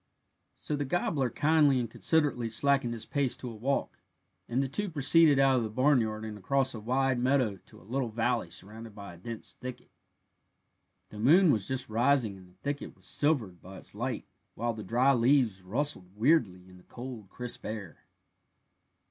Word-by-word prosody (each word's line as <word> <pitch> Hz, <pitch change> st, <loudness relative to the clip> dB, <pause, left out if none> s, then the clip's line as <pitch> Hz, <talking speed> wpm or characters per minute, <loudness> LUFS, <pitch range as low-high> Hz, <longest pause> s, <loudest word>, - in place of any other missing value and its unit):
So 150 Hz, -, -3 dB
the 145 Hz, -, -1 dB
gobbler 140 Hz, -3 st, 0 dB
kindly 145 Hz, +1 st, +3 dB
and 120 Hz, -, -1 dB
considerately 140 Hz, -1 st, +1 dB
slackened 135 Hz, +1 st, +1 dB
his 115 Hz, -1 st, -6 dB
pace 140 Hz, -3 st, 0 dB
to 125 Hz, -, -6 dB
a -, -, -9 dB
walk, 130 Hz, +6 st, -2 dB, 0.5 s
and 125 Hz, +3 st, +1 dB
the -, -, -1 dB
two 200 Hz, +10 st, -3 dB
proceeded 150 Hz, 0 st, +5 dB
out 135 Hz, -1 st, +4 dB
of -, -, +1 dB
the 110 Hz, -, -3 dB
barnyard 110 Hz, -3 st, +1 dB
and 105 Hz, -1 st, -7 dB
across 135 Hz, +6 st, +1 dB
a 115 Hz, -, -6 dB
wide 130 Hz, +3 st, +1 dB
meadow 125 Hz, -5 st, +2 dB
to -, -, -16 dB
a -, -, -18 dB
little 125 Hz, +4 st, -2 dB
valley 110 Hz, -5 st, 0 dB
surrounded 105 Hz, +5 st, -8 dB
by 100 Hz, -4 st, -9 dB
a -, -, -13 dB
dense 115 Hz, +4 st, -6 dB
thicket. 125 Hz, -1 st, -9 dB, 1.2 s
The 105 Hz, -, -10 dB
moon 160 Hz, -, +6 dB
was 105 Hz, -6 st, 0 dB
just 130 Hz, -1 st, -2 dB
rising 115 Hz, -1 st, +2 dB
and 95 Hz, -1 st, -15 dB
the 90 Hz, -, -26 dB
thicket 145 Hz, 0 st, -4 dB
was 95 Hz, -, -15 dB
silvered 110 Hz, -, 0 dB
by 95 Hz, +1 st, -11 dB
its -, -, -6 dB
light, -, -, -3 dB, 0.3 s
while 120 Hz, 0 st, -1 dB
the 110 Hz, -, -7 dB
dry 125 Hz, +7 st, +3 dB
leaves 120 Hz, -5 st, +3 dB
rustled 100 Hz, -2 st, -2 dB
weirdly 110 Hz, -, +2 dB
in 90 Hz, 0 st, -15 dB
the 90 Hz, -, -18 dB
cold 120 Hz, -5 st, -8 dB
crisp 125 Hz, +2 st, -7 dB
air. 105 Hz, -7 st, -6 dB
120 Hz, 180 wpm, -30 LUFS, 105-140 Hz, 1.2 s, moon